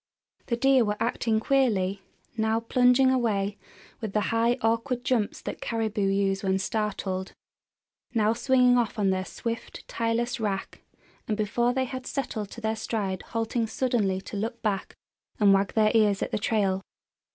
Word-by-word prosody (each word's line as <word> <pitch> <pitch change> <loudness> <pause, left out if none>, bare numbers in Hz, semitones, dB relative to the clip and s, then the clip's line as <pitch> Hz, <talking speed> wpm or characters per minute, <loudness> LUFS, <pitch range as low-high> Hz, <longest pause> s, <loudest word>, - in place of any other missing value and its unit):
The 235 - 0
deer 270 0 +4
were 210 -1 -1
acting 230 -1 0
queerly, 210 -7 +1 0.3
now 220 0 +1
plunging 250 +2 +4
away 210 -5 0 0.4
with 220 -4 -5
the 215 - +2
high, 230 +2 +2
awkward 230 +3 0
jumps 230 -6 0
that - - -6
caribou 220 -3 -1
use 195 0 +1
when 190 -1 +1
startled; 195 -2 -2 0.8
now 220 -1 +2
swinging 250 0 +4
off 235 0 -1
on 200 -2 +2
their 185 0 -1
swift, 230 +3 -6
tireless 235 +2 -1
rack, 200 -3 -3 0.5
and 215 - -1
before 235 +3 +1
they 260 +1 0
had 255 0 -6
settled 220 -7 -3
to 235 - -10
their 220 0 0
stride 200 -4 -2
halting 230 0 -2
suddenly 220 -6 0
to 210 - -8
look 230 +3 -4
back 200 -3 -2 0.4
and 200 -2 +6
wag 195 0 +1
their 215 -1 +4
ears 210 -3 +3
at - - -4
the - - -1
trail. 200 -3 +1
220 Hz, 160 wpm, -27 LUFS, 200-240 Hz, 0.8 s, and